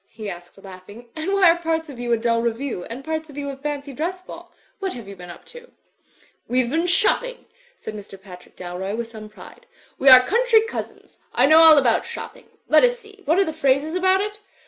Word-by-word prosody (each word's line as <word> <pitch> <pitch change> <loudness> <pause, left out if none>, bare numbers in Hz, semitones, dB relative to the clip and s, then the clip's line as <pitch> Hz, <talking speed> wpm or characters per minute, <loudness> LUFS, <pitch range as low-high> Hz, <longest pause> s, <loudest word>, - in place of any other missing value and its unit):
he 215 -1 -9
asked, 175 +1 -12
laughing, 200 +5 -13
''and 320 +4 -3
why 395 -2 +4
are 340 - -1
parts 325 -1 -2
of 275 -5 -11
you 240 0 -3
a 235 - +3
dull 230 0 0
review 235 -3 -3
and 245 +4 -8
parts 315 0 -4
of 290 - -13
you 280 -1 -4
a - - -8
fancy 285 0 -6
dress 345 +7 -4
ball? 365 - -12 0.3
What 385 -2 -3
have 235 -5 -10
you 200 - -9
been 180 -1 -12
up 175 - -12
to?" 485 0 -13 0.8
"WeVe 250 -1 +1
been 330 +3 0
shopping,*' - - 0 0.3
said 220 - -8
Mr. 205 -2 -11
Patrick 180 -2 -15
Dalroy, 185 +3 -5
with 230 -1 -5
some 215 -1 -10
pride. 345 - -15 0.3
"We 270 - +5
are 255 -1 +9
country 465 - +3
cousins. 455 - -8 0.2
I 250 - +4
know 310 +3 +6
all 320 -2 +8
about 245 -5 +2
shopping; - - -9 0.2
let - - +5
us - - +3
see, 425 -3 -18
what 320 +4 +2
are 390 - +3
the 315 - -4
phrases 290 0 0
about 375 +1 +2
it? 415 0 -5
280 Hz, 220 wpm, -22 LUFS, 225-355 Hz, 0.8 s, are